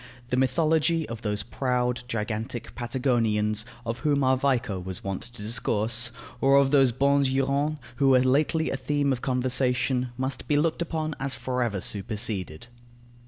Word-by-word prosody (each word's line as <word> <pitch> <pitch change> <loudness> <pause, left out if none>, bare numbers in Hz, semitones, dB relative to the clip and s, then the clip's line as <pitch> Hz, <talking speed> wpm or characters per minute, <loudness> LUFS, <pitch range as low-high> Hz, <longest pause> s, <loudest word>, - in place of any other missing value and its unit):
The - - +2
mythology 155 +4 +2
of 115 -1 -6
those 105 -3 -2
proud, 125 +1 -1
gigantic 115 +1 -4
Patagonians, 115 -4 +1 0.2
of 115 +1 -3
whom 140 +2 +1
our 130 0 +4
Vico 125 -7 0
was 90 0 -6
wont 95 -1 -3
to 120 -2 -9
discourse, 115 +1 0 0.3
or 135 +1 +5
of 140 -1 +4
those 135 -3 +5
bons 140 +2 +3
Hurons, 140 +3 0 0.2
who 140 -1 +3
were 130 -1 +6
lately 150 +5 +2
a - - -1
theme 145 0 0
of 125 - -5
conversation, 125 0 0
must 130 +1 -3
be 145 - +2
looked 160 +3 +1
upon 160 -2 -2
as 135 0 -2
for 125 -1 -2
ever 110 -5 0
superseded. 105 -5 -3
125 Hz, 160 wpm, -26 LUFS, 115-140 Hz, 0.3 s, were